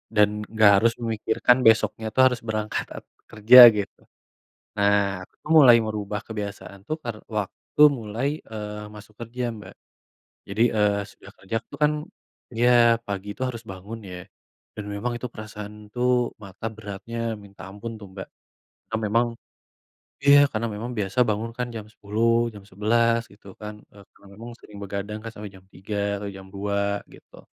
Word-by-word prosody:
dan 105 -1 +5 0.2
nggak 110 -2 +6
harus 115 +4 +3
memikirkan 115 +2 +2
besoknya 110 0 +3
tuh 130 - +5
harus 125 -2 +1
berangkat 110 -1 -3 0.3
kerja 110 +4 +7 0.2
gitu. 100 -1 -5 0.8
Nah, 100 0 +4 0.3
aku - - -18
tuh 155 - -5
mulai 130 -6 +9
merubah 105 -1 -3
kebiasaan 100 -2 -7
tuh 155 - -1
per 120 -2 -4 0.2
waktu 105 +7 -4 0.2
mulai, 110 +4 -3 0.2
eee, 105 -1 -6
masuk 105 0 -13
kerja 120 +2 -5
Mbak. 105 -3 -12 0.8
Jadi, 105 +3 0
eee, 105 -1 +2
sudah - - -15
kerja 95 +4 -4
tuh - - -10
kan 150 0 +5 0.6
iya, 120 +2 +3 0.4
pagi 100 0 -5
itu - - -7
harus 120 -2 -6
bangun 100 +4 -8
ya. 90 - -7 0.6
Dan 105 - -6
memang 120 +4 -2
itu 125 - -5
perasaan 105 -1 -8 0.2
tuh 125 0 +1 0.3
mata 100 +2 -8
beratnya 105 +2 -7 0.2
minta 100 -1 -14
ampun 105 +4 -7
tuh 100 - -9
Mbak. 95 - -7 0.6
Karena 110 - -2
memang 120 +2 +3 1.0
iya, 140 0 +8
karena 115 +1 -1
memang 115 +4 -5
biasa 100 +3 -3
bangun 110 +2 -1
kan 125 - -1
jam 110 -2 -6
10 110 +3 0 0.2
jam 100 - -11
11 115 +4 +2
gitu 100 0 -20
kan. 105 0 -7 0.2
E - - -18 0.2
karena - - -20
memang 115 +2 -8
sering 105 - -13
begadang 100 +2 -5
kan 115 - -6
sampai 105 -2 -8
jam 95 - -18
3 105 +2 -6 0.3
atau 100 - -4
jam 95 0 -11
2 100 +1 -2 0.4
gitu. - - -17
105 Hz, 160 wpm, -24 LUFS, 100-115 Hz, 1.0 s, mulai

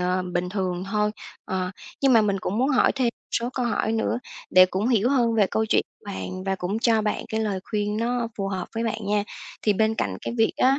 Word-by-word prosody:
ờ, 180 +1 +1
bình 175 +1 0
thường 185 -2 -2
thôi. 210 0 +2 0.3
Ờ. 185 -1 -2 0.3
Nhưng 275 -1 +4
mà 230 - +7
mình 200 -2 +1
cũng 200 +3 -2
muốn 260 +3 +3
hỏi 265 -3 +4
thêm 265 - 0
một 235 - -5
số 235 +1 0
câu 250 -2 0
hỏi 225 -1 0
nữa 225 +1 0 0.3
để 185 0 +8
cũng 190 +5 -1
hiểu 235 -2 +3
hơn 240 -4 +3
về 210 -3 +4
câu 220 0 +1
chuyện - - +3 0.2
bạn 185 -2 -5
và 195 0 0
cũng 190 +3 -2
cho 225 -2 +3
bạn 210 - -1
cái 220 - -1
lời 205 -4 -1
khuyên 210 -1 0
nó 235 +1 0
phù 195 -1 -1
hợp 190 -2 -3
với 230 +1 -1
bạn 220 -2 -3
nha. 205 0 +1 0.4
Thì 210 - +4
bên 220 +2 +2
cạnh - - -2
cái 235 - -4
việc 225 - +4
á 270 +2 +4
215 Hz, 245 wpm, -25 LUFS, 190-230 Hz, 0.4 s, để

